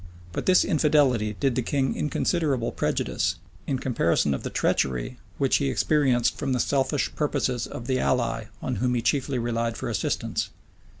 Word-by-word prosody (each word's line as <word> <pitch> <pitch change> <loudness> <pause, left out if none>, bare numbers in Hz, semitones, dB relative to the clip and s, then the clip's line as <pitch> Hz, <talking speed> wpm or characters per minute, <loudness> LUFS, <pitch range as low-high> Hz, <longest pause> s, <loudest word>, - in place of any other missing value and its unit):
But - - -4
this 185 -1 +5
infidelity 145 - +2
did 135 -2 +2
the 125 - 0
king 135 +2 0
inconsiderable 150 -5 0
prejudice, 85 0 -1 0.3
in 135 - 0
comparison 85 - +1
of 65 - -3
the - - -4
treachery 65 - 0 0.2
which 135 -2 +3
he 140 -2 0
experienced 130 -3 +2
from 135 -3 -1
the 125 - 0
selfish 135 +2 0
purposes 135 -5 -1
of 120 - -7
the 130 0 0
ally 115 -3 0 0.2
on 125 - -2
whom 125 0 +1
he 120 - -1
chiefly 135 0 +1
relied 115 -1 -1
for - - -4
assistance. - - -1
130 Hz, 165 wpm, -26 LUFS, 115-140 Hz, 0.3 s, this